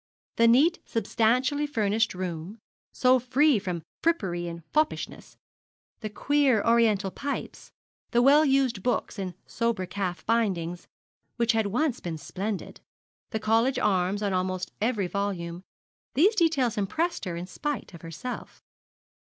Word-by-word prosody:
The 230 - +5
neat, 290 +9 +5
substantially 255 +5 +1
furnished 220 -5 +1
room 180 +2 -5 0.3
so 255 0 +4
free 260 +1 +3
from 180 -4 -4 0.2
frippery 180 - 0
or 170 0 -8
foppishness 310 0 -1 0.6
the 215 - -4
queer 265 0 +2
Oriental 220 -4 +3
pipes 280 +7 -5 0.4
the 240 +1 +3
well 290 +4 +7
used 270 -7 +2
books 240 -2 -1
in 185 -3 -4
sober 230 -5 -1
calf 180 -2 -4
bindings, 185 -7 0 0.5
which 235 -1 +2
had 220 -2 +1
once 250 +5 0
been 165 -2 -5
splendid 190 +8 -5 0.5
the 220 - -2
college 225 +5 +2
arms 195 0 +1
on 200 -2 0
almost 185 0 -2
every 220 -3 +1
volume 180 -2 -3 0.5
these 375 - +5
details 310 - +2
impressed 320 - -1
her 175 -2 -3
in 170 +1 -5
spite 285 +4 -4
of 170 - -11
herself. 175 - -7
220 Hz, 135 wpm, -27 LUFS, 185-255 Hz, 0.6 s, well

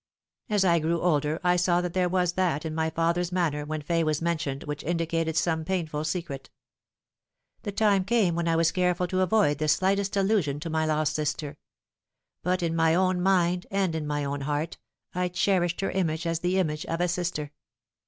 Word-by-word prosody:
As 205 -2 +2
I 170 -2 +4
grew 165 +2 0
older 155 -2 +1
I 180 0 +3
saw 175 0 +2
that 180 -1 -4
there 180 -1 +1
was 180 -1 +1
that 175 -5 0
in 160 - -3
my 160 0 0
father's 170 +2 0
manner 160 -5 0
when 155 0 -4
Fay 165 +2 +1
was 155 -1 0
mentioned 155 -5 -2
which 150 0 -5
indicated 165 -1 -1
some 160 0 +1
painful 155 -4 -2
secret. 155 -5 -4 1.1
The 205 - -4
time 200 -2 +2
came 205 -5 +2
when 170 0 -1
I 165 - +2
was 165 0 +3
careful 180 -1 +1
to 185 +1 -1
avoid 185 -5 +2
the 155 - 0
slightest 195 +5 +1
allusion 190 -8 +1
to 165 0 -4
my 160 0 0
lost 155 0 +1
sister; 150 -1 -2 0.9
but 180 +1 0
in 165 -1 0
my 165 0 +3
own 185 0 +2
mind 180 -1 +2
and 195 -3 0
in 155 -2 -3
my 145 -1 -1
own 140 0 -3
heart 150 +3 -3 0.3
I 180 0 0
cherished 180 -1 +1
her 195 - -1
image 170 -3 -1
as 165 -1 0
the 180 +2 0
image 155 -5 0
of 165 - -2
a 175 - +2
sister. 170 -4 -2
170 Hz, 195 wpm, -27 LUFS, 155-180 Hz, 1.1 s, I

